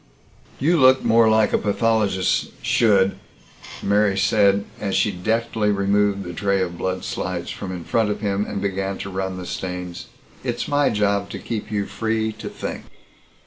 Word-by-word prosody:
"You 165 +5 +3
look 130 0 +6
more 115 0 +5
like 110 -1 +3
a - - +3
pathologist 105 -3 0
should," 100 -4 +3 0.6
Mary 100 -1 +2
said 100 0 +3
as 100 -2 -2
she 105 - +2
deftly 110 +3 0
removed 100 0 +1
the 90 -1 -7
tray 100 +3 0
of 90 -2 -2
blood 95 +2 -3
slides 85 -2 -3
from 95 - -6
in 90 -2 -6
front 110 +4 +1
of 105 - -2
him 100 -1 0
and - - -3
began 95 0 -2
to 100 - -6
run 95 0 -3
the 90 - -6
stains. 90 -1 -5 0.4
"It's - - -2
my 145 0 +2
job 100 -1 0
to - - -6
keep 110 -2 -5
you 100 -1 -1
free 110 0 -1
to - - -7
think." - - -6
100 Hz, 170 wpm, -22 LUFS, 95-110 Hz, 0.6 s, look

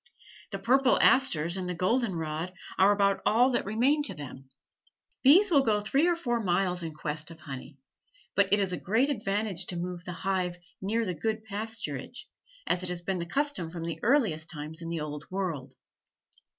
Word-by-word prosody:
The 195 - -4
purple 255 +6 +3
asters 175 - +4
and 180 -1 -3
the 180 - -2
golden 200 +3 +1
rod 160 +2 -3 0.3
are 195 +2 +6
about 200 -1 +2
all 245 +4 +4
that 240 - 0
remain 250 +9 +2
to 195 - -3
them. 135 -2 -10 0.7
Bees 360 +9 +6
will 285 -4 +6
go 215 -5 +2
three 270 +10 +2
or 350 - +3
four 240 -8 -1
miles 180 -2 +1
in 165 -1 -4
quest 155 +1 -4
of 165 -1 -12
honey, 135 0 -8 0.6
but 200 -1 +2
it 205 - +6
is 190 -2 0
a - - -1
great 235 +9 +2
advantage 200 -5 -1
to 180 - -2
move 175 0 -4
the 180 - -6
hive 185 -2 0 0.2
near 225 +4 0
the 180 - -2
good 215 +6 -2
pasturage, 215 - -4 0.4
as 180 - +1
has 180 -1 -2
been 185 +1 -2
the 170 - -4
custom 280 - -1
from 165 0 -6
the 165 0 -4
earliest 210 - +2
times 155 +1 -6
in 165 - -5
the 165 -2 -3
Old 150 -1 -6
World. 180 -8 -4
190 Hz, 190 wpm, -29 LUFS, 165-225 Hz, 0.7 s, are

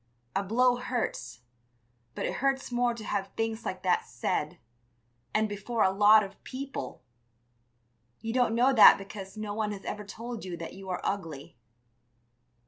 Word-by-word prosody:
A 195 - +2
blow 245 +5 +3
hurts, 220 - -3 0.7
but - - -2
it - - -2
hurts 270 -1 0
more 240 -1 +1
to 225 - -8
have 200 -2 -2
things 225 0 -2
like 185 - -4
that 180 -1 +2
said, 150 +7 -2 0.7
and 215 0 +2
before 210 +2 -1
a 190 - +4
lot 210 +2 +6
of 195 -1 -10
people! 270 - -6 1.2
You 225 0 -4
don't 245 -3 +2
know 255 +3 +4
that 225 - +9
because 195 0 -9
no 215 -1 -4
one 210 0 -1
has 195 - -9
ever 210 - -4
told 230 +3 -7
you 180 -2 -5
that 170 - -7
you 190 0 -10
are 180 - -2
ugly. 165 -8 -4
210 Hz, 160 wpm, -29 LUFS, 195-235 Hz, 1.2 s, that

